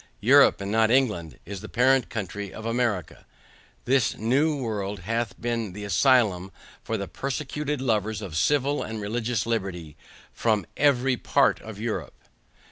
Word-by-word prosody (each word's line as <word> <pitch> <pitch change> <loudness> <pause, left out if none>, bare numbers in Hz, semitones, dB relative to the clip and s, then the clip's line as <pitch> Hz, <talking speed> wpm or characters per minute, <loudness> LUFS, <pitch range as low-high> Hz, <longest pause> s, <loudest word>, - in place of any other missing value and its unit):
Europe, - - +6
and 100 0 -4
not 110 0 +3
England, 105 - +1
is 100 0 -7
the 110 - -9
parent 130 0 +3
country 100 -1 -5
of 110 - -9
America. 115 -7 -1 0.6
This 130 -2 +2
new 140 +7 +1
world 105 -6 -3
hath 115 +5 -3
been 115 -4 -2
the 105 +2 -7
asylum 100 -4 +2 0.3
for - - -2
the - - -4
persecuted 145 +1 -3
lovers 110 -4 0
of 95 -7 -7
civil 145 - +1
and 110 0 -5
religious 110 +2 -2
liberty 95 -9 -3 0.4
from 110 -5 0
EVERY 135 -3 +2
PART - - +2
of 110 -2 -9
Europe. 110 0 -4
110 Hz, 145 wpm, -25 LUFS, 100-125 Hz, 0.6 s, Europe